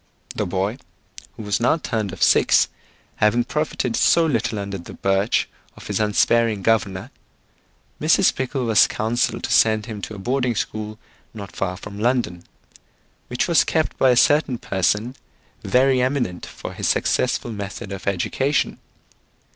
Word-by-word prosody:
The -, -, -2 dB
boy, 95 Hz, +7 st, -2 dB, 0.6 s
who -, -, -7 dB
was 105 Hz, -1 st, -1 dB
now 125 Hz, +7 st, +2 dB
turned 110 Hz, -, -3 dB
of -, -, -3 dB
six, -, -, +4 dB, 0.5 s
having 110 Hz, +3 st, +3 dB
profited 130 Hz, -3 st, -2 dB
so 170 Hz, -, +4 dB
little 115 Hz, -7 st, -1 dB
under 100 Hz, -1 st, -5 dB
the 85 Hz, -, -11 dB
birch 95 Hz, +3 st, +1 dB, 0.3 s
of -, -, -12 dB
his -, -, -2 dB
unsparing 110 Hz, 0 st, +2 dB
governor, 100 Hz, -4 st, 0 dB, 0.9 s
Mrs. -, -, +4 dB
Pickle 130 Hz, 0 st, -3 dB
was 110 Hz, -2 st, +5 dB
counselled 115 Hz, +2 st, -1 dB
to -, -, -3 dB
send 110 Hz, -1 st, +3 dB
him 110 Hz, -4 st, -7 dB
to 110 Hz, -, -6 dB
a -, -, -8 dB
boarding 125 Hz, +3 st, -1 dB
school 110 Hz, 0 st, -4 dB, 0.4 s
not 100 Hz, -3 st, -9 dB
far 90 Hz, -1 st, -2 dB
from 105 Hz, +1 st, -9 dB
London, 115 Hz, -7 st, 0 dB, 0.8 s
which 125 Hz, -, -1 dB
was 170 Hz, -2 st, +4 dB
kept 160 Hz, -1 st, -1 dB
by 130 Hz, -, +5 dB
a 125 Hz, -, +4 dB
certain 145 Hz, 0 st, +3 dB
person 105 Hz, +6 st, -1 dB, 0.5 s
very 130 Hz, 0 st, +3 dB
eminent 125 Hz, -9 st, -1 dB
for -, -, -8 dB
his -, -, -3 dB
successful 125 Hz, -1 st, 0 dB
method 100 Hz, -1 st, -6 dB
of 100 Hz, 0 st, -7 dB
education. 130 Hz, -, 0 dB
110 Hz, 150 wpm, -22 LUFS, 100-125 Hz, 0.9 s, was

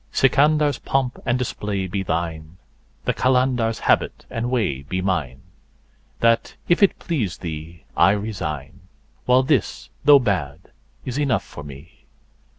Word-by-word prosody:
Sikandar's3 145 Hz, +2 st, +3 dB
pomp 135 Hz, -2 st, -1 dB
and 120 Hz, 0 st, +2 dB
display 105 Hz, -6 st, -3 dB
be 95 Hz, +2 st, -3 dB
thine, 80 Hz, -2 st, -3 dB, 0.5 s
the -, -, +1 dB
Qalandar's4 125 Hz, -3 st, +1 dB
habit -, -, +1 dB
and 115 Hz, +1 st, -2 dB
way 105 Hz, -, 0 dB
be 90 Hz, +7 st, -4 dB
mine; 80 Hz, -9 st, -2 dB, 0.8 s
That, 115 Hz, 0 st, +2 dB
if 175 Hz, -, +3 dB
it 200 Hz, -, +4 dB
please 115 Hz, -, -2 dB
thee, 80 Hz, 0 st, -7 dB
I 85 Hz, -, +5 dB
resign, 95 Hz, -10 st, -4 dB, 0.5 s
while 125 Hz, +1 st, +5 dB
this, 130 Hz, -4 st, -1 dB
though 145 Hz, 0 st, +8 dB
bad, 90 Hz, -, -2 dB, 0.3 s
is 130 Hz, +2 st, -3 dB
enough 130 Hz, -8 st, +1 dB
for 75 Hz, -, -10 dB
me. 70 Hz, -1 st, -13 dB
105 Hz, 135 wpm, -22 LUFS, 80-130 Hz, 0.8 s, though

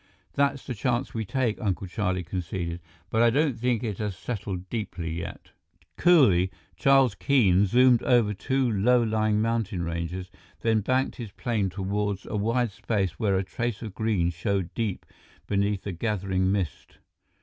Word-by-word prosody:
"That's 140 Hz, -1 st, +1 dB
the 130 Hz, -, -3 dB
chance 120 Hz, +3 st, -1 dB
we 110 Hz, -1 st, -2 dB
take," 120 Hz, +1 st, -1 dB
Uncle 100 Hz, -3 st, -1 dB
Charlie 90 Hz, -1 st, -1 dB
conceded. 85 Hz, 0 st, -4 dB, 0.3 s
"But 110 Hz, -, +2 dB
I 120 Hz, -, +6 dB
don't 140 Hz, +2 st, +2 dB
think 120 Hz, -1 st, 0 dB
it 105 Hz, -5 st, -3 dB
has 105 Hz, -4 st, -3 dB
settled 95 Hz, -5 st, -5 dB
deeply 90 Hz, -7 st, -4 dB
yet." 85 Hz, +1 st, -7 dB, 0.4 s
Coolly, 120 Hz, -, +5 dB, 0.3 s
Charles 135 Hz, -4 st, +4 dB
Keene 100 Hz, -7 st, +3 dB
zoomed 125 Hz, +2 st, +5 dB
over 115 Hz, -4 st, +3 dB
two 130 Hz, +6 st, 0 dB
low 120 Hz, +3 st, +3 dB
lying 110 Hz, -1 st, +1 dB
mountain 110 Hz, -5 st, -1 dB
ranges, 85 Hz, +2 st, -4 dB, 0.3 s
then 110 Hz, -1 st, +2 dB
banked 130 Hz, +5 st, 0 dB
his 115 Hz, -5 st, -7 dB
plane 110 Hz, -5 st, -1 dB
toward 100 Hz, +2 st, -2 dB
a -, -, -5 dB
wide 115 Hz, +2 st, +1 dB
space 95 Hz, -3 st, -2 dB
where 100 Hz, -3 st, +2 dB
a 95 Hz, -, 0 dB
trace 115 Hz, +3 st, -3 dB
of 110 Hz, -4 st, -6 dB
green 100 Hz, -5 st, 0 dB
showed 95 Hz, +1 st, -2 dB
deep 110 Hz, -5 st, -3 dB, 0.4 s
beneath 100 Hz, 0 st, 0 dB
the 100 Hz, -, -4 dB
gathering 95 Hz, -1 st, 0 dB
mist. 95 Hz, -6 st, -3 dB
105 Hz, 160 wpm, -26 LUFS, 95-120 Hz, 0.4 s, I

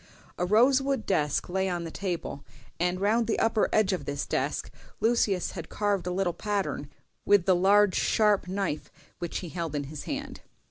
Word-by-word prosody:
A 180 Hz, -, 0 dB
rosewood 260 Hz, +4 st, +3 dB
desk 150 Hz, -6 st, 0 dB
lay 190 Hz, +1 st, 0 dB
on 175 Hz, -1 st, -2 dB
the 165 Hz, -, -6 dB
table, 175 Hz, -7 st, -4 dB, 0.4 s
and 180 Hz, +1 st, 0 dB
round 220 Hz, +3 st, +2 dB
the 225 Hz, -, 0 dB
upper 225 Hz, -1 st, +2 dB
edge 210 Hz, -2 st, +3 dB
of 175 Hz, -7 st, -3 dB
this 145 Hz, 0 st, -3 dB
desk -, -, -2 dB, 0.3 s
Lucius 220 Hz, -5 st, +1 dB
had 170 Hz, -4 st, -7 dB
carved 205 Hz, -4 st, -1 dB
a -, -, -1 dB
little 180 Hz, -1 st, 0 dB
pattern 200 Hz, -9 st, -2 dB, 0.3 s
with 200 Hz, -3 st, +4 dB
the 185 Hz, -, +4 dB
large 200 Hz, +2 st, +4 dB
sharp 210 Hz, -4 st, +2 dB
knife 185 Hz, -5 st, -2 dB, 0.3 s
which 175 Hz, -, -3 dB
he 175 Hz, -, -6 dB
held 165 Hz, -3 st, -4 dB
in 145 Hz, -, -1 dB
his 145 Hz, +1 st, -8 dB
hand. -, -, -5 dB
190 Hz, 180 wpm, -28 LUFS, 170-210 Hz, 0.4 s, with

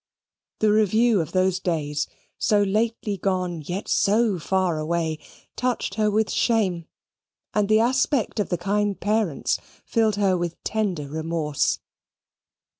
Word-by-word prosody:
The 215 Hz, -1 st, +4 dB
review 215 Hz, 0 st, +3 dB
of 155 Hz, -, -5 dB
those 185 Hz, 0 st, +2 dB
days, 150 Hz, -5 st, -1 dB, 0.3 s
so 205 Hz, -1 st, +3 dB
lately 215 Hz, 0 st, 0 dB
gone 180 Hz, -3 st, -1 dB
yet 180 Hz, +7 st, -4 dB
so 210 Hz, -2 st, +2 dB
far 180 Hz, -1 st, 0 dB
away, 160 Hz, 0 st, -1 dB, 0.4 s
touched 250 Hz, -5 st, -1 dB
her 215 Hz, +1 st, +1 dB
with 215 Hz, +1 st, +1 dB
shame; 190 Hz, -8 st, +1 dB, 0.7 s
and 210 Hz, -1 st, +1 dB
the 215 Hz, 0 st, +5 dB
aspect 255 Hz, -1 st, +1 dB
of 205 Hz, -, 0 dB
the 175 Hz, -, 0 dB
kind 200 Hz, +3 st, 0 dB
parents 210 Hz, -8 st, 0 dB, 0.3 s
filled 220 Hz, -2 st, +2 dB
her 200 Hz, -2 st, +2 dB
with 175 Hz, -1 st, -2 dB
tender 195 Hz, -9 st, -1 dB
remorse. 155 Hz, -1 st, -1 dB
195 Hz, 130 wpm, -24 LUFS, 170-215 Hz, 0.7 s, the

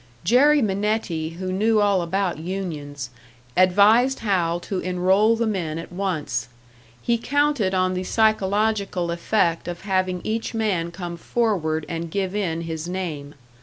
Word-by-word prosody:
Jerry 275 Hz, -, +5 dB
Minetti, 190 Hz, -6 st, -1 dB
who 185 Hz, 0 st, -3 dB
knew 215 Hz, +3 st, +2 dB
all 200 Hz, -3 st, +3 dB
about 180 Hz, -1 st, -1 dB
unions, 155 Hz, -7 st, -5 dB, 0.4 s
advised 205 Hz, +8 st, +4 dB
Hal 175 Hz, -5 st, +1 dB
to 190 Hz, 0 st, -3 dB
enroll 190 Hz, +5 st, +2 dB
the 230 Hz, +1 st, 0 dB
men 175 Hz, -8 st, -2 dB
at 165 Hz, -, -7 dB
once; 160 Hz, -, -2 dB, 0.6 s
he 235 Hz, -1 st, +1 dB
counted 285 Hz, -8 st, +1 dB
on 185 Hz, 0 st, +1 dB
the 185 Hz, 0 st, -2 dB
psychological 205 Hz, -3 st, +1 dB
effect 170 Hz, 0 st, 0 dB
of 175 Hz, -1 st, -5 dB
having 185 Hz, -2 st, 0 dB
each 225 Hz, +1 st, -3 dB
man 195 Hz, -7 st, 0 dB
come 170 Hz, 0 st, -6 dB
forward 165 Hz, -7 st, -1 dB
and 165 Hz, 0 st, -4 dB
give 190 Hz, +2 st, -2 dB
in 170 Hz, -5 st, -1 dB
his 165 Hz, -1 st, -5 dB
name. 155 Hz, -6 st, -5 dB
185 Hz, 140 wpm, -23 LUFS, 170-210 Hz, 0.6 s, Jerry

